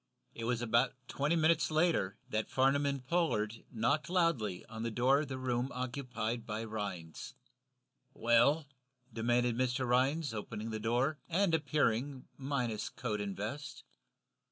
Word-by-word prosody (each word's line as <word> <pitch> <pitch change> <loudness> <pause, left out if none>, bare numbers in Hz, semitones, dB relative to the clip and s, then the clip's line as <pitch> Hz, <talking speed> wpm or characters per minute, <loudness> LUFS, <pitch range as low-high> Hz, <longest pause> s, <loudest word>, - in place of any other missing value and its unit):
It 115 - -5
was 120 0 0
about 120 +2 +2
twenty 150 +4 0
minutes 165 0 +3
later 155 - +2
that 110 0 -2
Farnum 135 +2 +3
and 140 -2 -2
Pollard 115 -9 0
knocked 140 +6 +1
loudly 160 - +1
on 110 0 -8
the 115 - -1
door 125 +5 +3
of 150 - -2
the 130 -1 -4
room 125 0 -1
occupied 125 -2 -3
by 110 -1 -4
Rhinds. 100 -7 -5 0.8
"Well?" 120 +7 +4 0.5
demanded 120 +1 +2
Mr. 130 +1 0
Rhinds, 135 +3 +2
opening 110 +1 -5
the 110 - -3
door, 125 +7 +1
and 180 +1 +2
appearing, 140 -3 +1
minus 125 -6 -2
coat 105 -4 -3
and 100 -1 -4
vest. 135 +8 -5
125 Hz, 140 wpm, -33 LUFS, 110-140 Hz, 0.8 s, Well